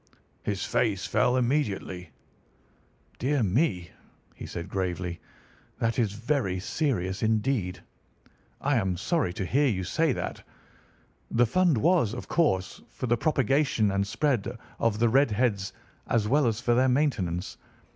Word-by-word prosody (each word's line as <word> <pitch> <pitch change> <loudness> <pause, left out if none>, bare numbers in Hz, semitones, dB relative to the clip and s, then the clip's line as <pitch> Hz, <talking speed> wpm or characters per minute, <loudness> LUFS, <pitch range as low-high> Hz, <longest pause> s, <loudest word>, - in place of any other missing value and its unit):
"His 100 -1 -2
face 105 -5 0
fell 125 +1 +2
immediately. 110 - -1 1.1
"'Dear 135 0 +1
me!' 95 - 0 0.4
he - - -9
said 85 - -6
gravely, 90 -2 -3 0.6
'that 115 +1 0
is 110 -4 +1
very 115 -4 -1
serious 95 - -1
indeed! 110 -5 0 0.8
I 140 -1 +1
am 95 -5 0
sorry 150 - 0
to 95 -1 -3
hear 140 +9 +2
you 95 -7 0
say 160 - +1
that. - - -4 0.9
The 120 +1 +3
fund 175 +3 +2
was, 160 - +2
of 125 - -7
course, 95 - 0
for - - -5
the 120 -1 +3
propagation 135 -4 +2
and 100 0 0
spread 125 -1 0 0.2
of 115 -2 +1
the 120 +2 +3
red 135 +3 +4
heads 105 -3 0 0.4
as 110 -3 +1
well 140 +2 +3
as 115 -1 0
for 120 - +1
their 130 +2 +3
maintenance. 110 - 0
115 Hz, 140 wpm, -27 LUFS, 95-135 Hz, 1.1 s, red